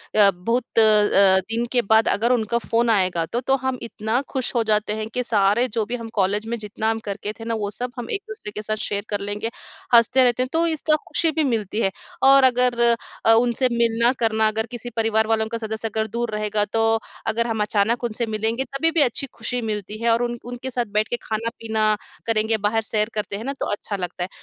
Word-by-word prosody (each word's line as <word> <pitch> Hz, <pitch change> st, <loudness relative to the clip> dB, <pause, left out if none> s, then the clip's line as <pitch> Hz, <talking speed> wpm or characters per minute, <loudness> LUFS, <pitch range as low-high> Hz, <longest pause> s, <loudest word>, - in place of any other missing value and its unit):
अ, 205 Hz, -2 st, +7 dB
बहुत 230 Hz, +8 st, -1 dB, 0.2 s
अ, 205 Hz, -3 st, +5 dB
दिन 225 Hz, +5 st, -2 dB
के 245 Hz, -, +3 dB
बाद 220 Hz, 0 st, +5 dB
अगर 230 Hz, +4 st, +2 dB
उनका 235 Hz, -1 st, +1 dB
फ़ोन 235 Hz, 0 st, 0 dB
आएगा 185 Hz, -6 st, +2 dB
तो, 235 Hz, +9 st, -3 dB
तो 265 Hz, +2 st, +2 dB
हम 260 Hz, -1 st, -2 dB
इतना 225 Hz, +2 st, -2 dB
खुश 260 Hz, -3 st, -3 dB
हो 235 Hz, -, +3 dB
जाते 210 Hz, 0 st, +2 dB
हैं 215 Hz, 0 st, -4 dB
कि 250 Hz, -, 0 dB
सारे 210 Hz, +2 st, +2 dB
जो 225 Hz, -2 st, -2 dB
भी 240 Hz, +3 st, -4 dB
हम 230 Hz, -2 st, -6 dB
कॉलेज़ 210 Hz, +2 st, 0 dB
में 235 Hz, -, -2 dB
जितना 215 Hz, +1 st, -3 dB
हम 225 Hz, -, -2 dB
करते 205 Hz, +1 st, -4 dB
थे 225 Hz, -, -7 dB
ना 230 Hz, -, -2 dB
वो 205 Hz, -1 st, -2 dB
सब 245 Hz, +3 st, -3 dB
हम 235 Hz, -, -6 dB
एक 400 Hz, -, -2 dB
दूसरे 430 Hz, -, -7 dB
के 210 Hz, -, -6 dB
साथ 215 Hz, 0 st, -2 dB
शेयर 205 Hz, 0 st, -2 dB
कर 205 Hz, -1 st, -1 dB
लेंगे, 205 Hz, +3 st, -3 dB, 0.5 s
हँसते 250 Hz, +3 st, +5 dB
रहते 245 Hz, 0 st, +3 dB
हैं। 255 Hz, -, -5 dB
तो 330 Hz, +1 st, +2 dB
इसका 315 Hz, -1 st, +1 dB
खुशी 325 Hz, -, +2 dB
भी 315 Hz, 0 st, 0 dB
मिलती 225 Hz, -5 st, -1 dB
है 195 Hz, -, +1 dB, 0.3 s
और 275 Hz, 0 st, +7 dB
अगर 250 Hz, -1 st, +3 dB, 0.5 s
अ, 225 Hz, -, +6 dB
उनसे 240 Hz, +2 st, +3 dB
मिलना 235 Hz, 0 st, +3 dB
करना 220 Hz, -1 st, +2 dB
अगर 220 Hz, +1 st, -1 dB
किसी 240 Hz, 0 st, -6 dB
परिवार 220 Hz, -1 st, +1 dB
वालों 220 Hz, 0 st, +1 dB
का 230 Hz, -, 0 dB
सदस्य 220 Hz, 0 st, -4 dB
अगर 220 Hz, 0 st, -2 dB
दूर 240 Hz, -1 st, -1 dB
रहेगा 210 Hz, 0 st, 0 dB
तो, 225 Hz, +1 st, +1 dB, 0.3 s
अगर 230 Hz, +2 st, 0 dB
हम 220 Hz, -2 st, -1 dB
अचानक 210 Hz, +3 st, +1 dB
उनसे 235 Hz, 0 st, -2 dB
मिलेंगे 220 Hz, +3 st, -1 dB
तभी 275 Hz, +5 st, -1 dB
भी 325 Hz, -1 st, +2 dB
अच्छी 275 Hz, +1 st, +1 dB
खुशी 245 Hz, +2 st, -3 dB
मिलती 210 Hz, +1 st, -5 dB
है। 235 Hz, -, +3 dB
और 235 Hz, +1 st, +2 dB
उन 240 Hz, 0 st, -2 dB
उनके 245 Hz, +1 st, -5 dB
साथ 240 Hz, -1 st, -1 dB
बैठ 215 Hz, +1 st, +1 dB
के -, -, 0 dB
खाना-पीना 220 Hz, 0 st, -3 dB, 0.4 s
करेंगे, 220 Hz, 0 st, +1 dB
बाहर 210 Hz, +2 st, 0 dB
सैर 215 Hz, 0 st, -1 dB
करते 210 Hz, -1 st, -3 dB
हैं 220 Hz, -, -7 dB
ना 275 Hz, -, -2 dB
तो -, -, -1 dB
अच्छा 205 Hz, 0 st, -3 dB
लगता 180 Hz, -1 st, -4 dB
है। 180 Hz, -, -5 dB
225 Hz, 230 wpm, -22 LUFS, 210-240 Hz, 0.5 s, अ